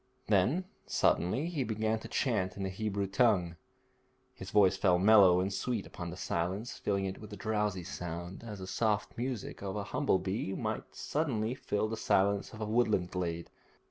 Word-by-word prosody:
Then 110 Hz, -, +2 dB, 0.2 s
suddenly 100 Hz, -, +2 dB
he 165 Hz, -6 st, -1 dB
began 110 Hz, -1 st, 0 dB
to -, -, -9 dB
chant 105 Hz, -9 st, 0 dB
in 100 Hz, -, -3 dB
the 95 Hz, -, -1 dB
Hebrew 100 Hz, 0 st, -2 dB
tongue. 95 Hz, -4 st, +2 dB, 0.8 s
His 95 Hz, -, -9 dB
voice 95 Hz, -2 st, +5 dB
fell 95 Hz, -2 st, +3 dB
mellow 95 Hz, -2 st, +7 dB
and 95 Hz, +2 st, -1 dB
sweet 110 Hz, +2 st, -2 dB
upon 85 Hz, -1 st, -7 dB
the 90 Hz, -, -7 dB
silence, 95 Hz, +5 st, -2 dB
filling 100 Hz, -1 st, 0 dB
it 95 Hz, 0 st, -4 dB
with 105 Hz, -1 st, -8 dB
drowsy 105 Hz, -3 st, -1 dB
sound, 85 Hz, +3 st, -6 dB
as 105 Hz, -3 st, -7 dB
the 95 Hz, -, -7 dB
soft 105 Hz, +1 st, 0 dB
music 125 Hz, -2 st, -4 dB
of 95 Hz, 0 st, -4 dB
a 105 Hz, -, -2 dB
humble 100 Hz, -1 st, +1 dB
bee 95 Hz, +1 st, -2 dB
will -, -, -2 dB
suddenly 125 Hz, -7 st, -1 dB
fill 110 Hz, -4 st, -1 dB
the 110 Hz, +1 st, -4 dB
silence 100 Hz, -1 st, +2 dB
of 110 Hz, -, -10 dB
a -, -, 0 dB
woodland 105 Hz, -5 st, +1 dB
glade. 85 Hz, -2 st, -3 dB
100 Hz, 175 wpm, -32 LUFS, 95-110 Hz, 0.8 s, mellow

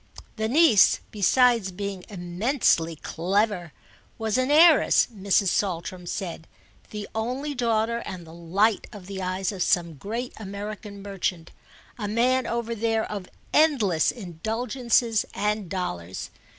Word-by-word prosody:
The 220 Hz, 0 st, -1 dB
niece, 275 Hz, -, +5 dB
besides 230 Hz, 0 st, +3 dB
being 195 Hz, 0 st, -5 dB
immensely 175 Hz, -, 0 dB
clever, 180 Hz, +2 st, -1 dB, 0.5 s
was 220 Hz, -2 st, -1 dB
an 255 Hz, +1 st, +1 dB
heiress, 315 Hz, +1 st, +6 dB
Mrs. 200 Hz, 0 st, +2 dB
Saltram 180 Hz, -1 st, -2 dB
said; 170 Hz, -4 st, -5 dB, 0.4 s
the 210 Hz, -1 st, -6 dB
only 255 Hz, +7 st, -2 dB
daughter 235 Hz, -2 st, 0 dB
and 185 Hz, -6 st, -7 dB
the 160 Hz, -, -13 dB
light 190 Hz, +6 st, +1 dB
of 205 Hz, -5 st, -11 dB
the 195 Hz, 0 st, -6 dB
eyes 185 Hz, +1 st, -1 dB
of 195 Hz, -3 st, -6 dB
some 170 Hz, -2 st, +2 dB
great 225 Hz, -, -5 dB
American 200 Hz, 0 st, -7 dB
merchant, 190 Hz, -4 st, -3 dB, 0.5 s
a 210 Hz, -, -2 dB
man, 250 Hz, +4 st, +2 dB
over 235 Hz, 0 st, -2 dB
there, 225 Hz, 0 st, 0 dB
of 200 Hz, -3 st, -6 dB, 0.2 s
endless 235 Hz, -, +3 dB
indulgences 225 Hz, +3 st, 0 dB
and 210 Hz, -3 st, -1 dB
dollars. 95 Hz, -, -4 dB
205 Hz, 125 wpm, -25 LUFS, 180-230 Hz, 0.5 s, heiress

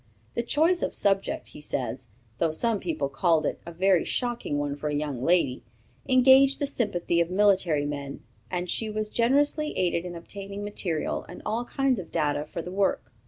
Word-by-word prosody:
_ -, -, -35 dB, 0.3 s
"The -, -, 0 dB
choice 320 Hz, +9 st, +2 dB
of -, -, -2 dB
subject," 195 Hz, -1 st, 0 dB
he -, -, -12 dB
says, 125 Hz, -3 st, -3 dB, 0.3 s
"though 165 Hz, -, +2 dB
some 215 Hz, +7 st, 0 dB
people 160 Hz, -6 st, -2 dB
called 160 Hz, +3 st, +2 dB
it -, -, -2 dB
a -, -, -5 dB
'very 185 Hz, +1 st, +3 dB
shocking 240 Hz, -, -2 dB
one 145 Hz, -1 st, -2 dB
for 150 Hz, +1 st, -4 dB
a 150 Hz, -, -1 dB
young 145 Hz, -4 st, -3 dB
lady,' 165 Hz, -6 st, +2 dB, 0.5 s
engaged 265 Hz, +1 st, +6 dB
the 285 Hz, -, -1 dB
sympathy 190 Hz, -10 st, 0 dB
of 170 Hz, -, 0 dB
military 185 Hz, -6 st, +3 dB
men, 140 Hz, -1 st, -5 dB, 0.3 s
and 180 Hz, 0 st, -2 dB
she 220 Hz, +5 st, -1 dB
was 215 Hz, 0 st, -3 dB
generously 290 Hz, +5 st, +2 dB
aided 175 Hz, -2 st, +1 dB
in 175 Hz, -1 st, -6 dB
obtaining 200 Hz, +4 st, -7 dB
material 180 Hz, -6 st, -2 dB
and 175 Hz, -, -10 dB
all 225 Hz, +3 st, -1 dB
kinds 270 Hz, -3 st, 0 dB
of 180 Hz, -, -9 dB
data 150 Hz, -2 st, 0 dB
for 165 Hz, +2 st, -6 dB
the 180 Hz, -, -7 dB
work. 195 Hz, +1 st, 0 dB
180 Hz, 190 wpm, -27 LUFS, 150-230 Hz, 0.5 s, engaged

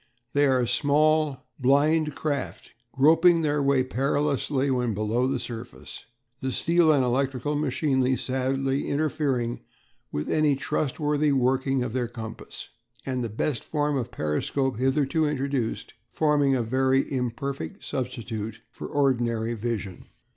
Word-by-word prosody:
They 145 Hz, 0 st, +4 dB
are 130 Hz, -2 st, +2 dB
small, 150 Hz, +1 st, +2 dB
blind 150 Hz, +3 st, +3 dB
craft, 145 Hz, -3 st, -4 dB, 0.2 s
groping 165 Hz, +4 st, +5 dB
their 150 Hz, -1 st, +1 dB
way 140 Hz, -2 st, +3 dB
perilously 140 Hz, +1 st, 0 dB
when 125 Hz, -4 st, 0 dB
below 110 Hz, +5 st, 0 dB
the 135 Hz, 0 st, 0 dB
surface, 120 Hz, 0 st, -8 dB, 0.3 s
the 130 Hz, -1 st, -2 dB
steel 170 Hz, +3 st, +3 dB
and 140 Hz, -3 st, +3 dB
electrical 135 Hz, +3 st, 0 dB
machinery 135 Hz, -2 st, +1 dB
sadly 135 Hz, +1 st, -1 dB
interfering 140 Hz, -5 st, -1 dB, 0.5 s
with 75 Hz, -, -3 dB
any 150 Hz, -2 st, +2 dB
trustworthy 150 Hz, +2 st, 0 dB
working 130 Hz, 0 st, +1 dB
of 120 Hz, -3 st, -4 dB
their 125 Hz, -2 st, -1 dB
compass, 110 Hz, -1 st, -9 dB, 0.4 s
and 130 Hz, -2 st, -2 dB
the 115 Hz, -, -3 dB
best 120 Hz, +5 st, -2 dB
form 150 Hz, -1 st, -1 dB
of 125 Hz, -4 st, -2 dB
periscope 115 Hz, -, -1 dB
hitherto 145 Hz, +4 st, +1 dB
introduced 135 Hz, -4 st, -2 dB, 0.2 s
forming 145 Hz, -3 st, +2 dB
a 120 Hz, -, 0 dB
very 130 Hz, +3 st, +2 dB
imperfect 125 Hz, -, -4 dB
substitute 115 Hz, -4 st, -4 dB
for -, -, -7 dB
ordinary 120 Hz, -5 st, 0 dB
vision. 110 Hz, -4 st, -4 dB
135 Hz, 125 wpm, -26 LUFS, 125-145 Hz, 0.5 s, groping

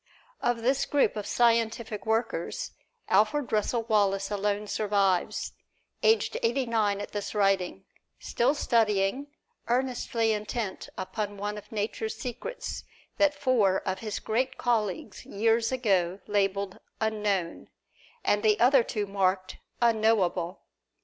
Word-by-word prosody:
Of 235 Hz, -1 st, 0 dB
this 265 Hz, +3 st, +2 dB
group 285 Hz, -5 st, +2 dB
of 210 Hz, -2 st, -4 dB
scientific 230 Hz, -2 st, +1 dB
workers, 230 Hz, -, -1 dB, 0.4 s
Alfred 225 Hz, +8 st, +2 dB
Russel 220 Hz, +2 st, +1 dB
Wallace 200 Hz, -3 st, +1 dB
alone 205 Hz, +1 st, -1 dB
survives, 200 Hz, -4 st, 0 dB, 0.5 s
aged 445 Hz, 0 st, +3 dB
eighty 245 Hz, +3 st, +1 dB
nine 215 Hz, -4 st, +1 dB
at 205 Hz, -, -6 dB
this 205 Hz, +1 st, -4 dB
writing, 195 Hz, -2 st, +1 dB, 0.3 s
still 255 Hz, +5 st, +1 dB
studying, 225 Hz, 0 st, +1 dB, 0.4 s
earnestly 240 Hz, -2 st, 0 dB
intent 210 Hz, -1 st, -4 dB
upon 205 Hz, +2 st, -4 dB
one 205 Hz, +1 st, -3 dB
of 210 Hz, -, -10 dB
Nature's 220 Hz, +1 st, -3 dB
secrets 250 Hz, -, -5 dB, 0.4 s
that 295 Hz, -1 st, +4 dB
four 240 Hz, -9 st, +2 dB
of 190 Hz, 0 st, -1 dB
his 215 Hz, -2 st, -4 dB
great 255 Hz, +4 st, -1 dB
colleagues 215 Hz, -4 st, -1 dB
years 225 Hz, +3 st, +1 dB
ago 195 Hz, -8 st, +1 dB
labeled 200 Hz, -2 st, 0 dB, 0.2 s
"Unknown," 210 Hz, -5 st, -1 dB, 0.6 s
and 205 Hz, -, +3 dB
the 210 Hz, -1 st, +3 dB
other 255 Hz, +2 st, +6 dB
two 215 Hz, -2 st, -2 dB
marked 190 Hz, -1 st, 0 dB, 0.3 s
"Unknowable." 215 Hz, -6 st, +2 dB
215 Hz, 120 wpm, -28 LUFS, 200-235 Hz, 0.6 s, other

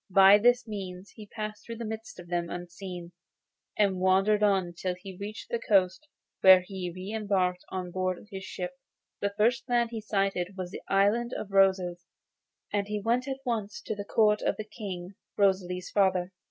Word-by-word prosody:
By 195 Hz, +2 st, +8 dB
this 245 Hz, +2 st, +3 dB
means 190 Hz, -3 st, -6 dB
he 215 Hz, -1 st, -12 dB
passed 215 Hz, 0 st, -6 dB
through 230 Hz, -, -7 dB
the 230 Hz, 0 st, -5 dB
midst 220 Hz, +8 st, -6 dB
of 175 Hz, -, -10 dB
them 170 Hz, -1 st, -1 dB
unseen, 175 Hz, 0 st, -7 dB, 0.7 s
and 195 Hz, -3 st, +2 dB
wandered 195 Hz, +3 st, +3 dB
on 190 Hz, -4 st, +2 dB
till 180 Hz, +1 st, -3 dB
he 190 Hz, +1 st, -10 dB
reached 205 Hz, +3 st, -7 dB
the 235 Hz, -, 0 dB
coast, 195 Hz, +6 st, +2 dB, 0.3 s
where 190 Hz, -1 st, +8 dB
he 185 Hz, -1 st, -5 dB
re 185 Hz, +3 st, -7 dB
embarked 190 Hz, -4 st, 0 dB
on 180 Hz, -1 st, -4 dB
board 185 Hz, +1 st, -2 dB
his 190 Hz, -1 st, -6 dB
ship. 180 Hz, -1 st, -5 dB, 0.5 s
The 200 Hz, 0 st, -2 dB
first 235 Hz, +4 st, +2 dB
land 240 Hz, -1 st, +2 dB
he 225 Hz, -2 st, -4 dB
sighted 195 Hz, -3 st, -1 dB
was 180 Hz, -1 st, -5 dB
the -, -, -7 dB
Island 210 Hz, +5 st, +2 dB
of 200 Hz, -, -6 dB
Roses, 190 Hz, -3 st, +3 dB, 0.7 s
and 200 Hz, -1 st, 0 dB
he 210 Hz, 0 st, -2 dB
went 240 Hz, +5 st, 0 dB
at 270 Hz, 0 st, -4 dB
once 220 Hz, -4 st, -2 dB
to -, -, -3 dB
the 205 Hz, -, -5 dB
court 210 Hz, 0 st, +3 dB
of -, -, 0 dB
the 215 Hz, -, -5 dB
King, 195 Hz, -4 st, -7 dB, 0.2 s
Rosalie's 185 Hz, -2 st, +1 dB
father. 190 Hz, -2 st, +2 dB
195 Hz, 180 wpm, -29 LUFS, 185-215 Hz, 0.7 s, By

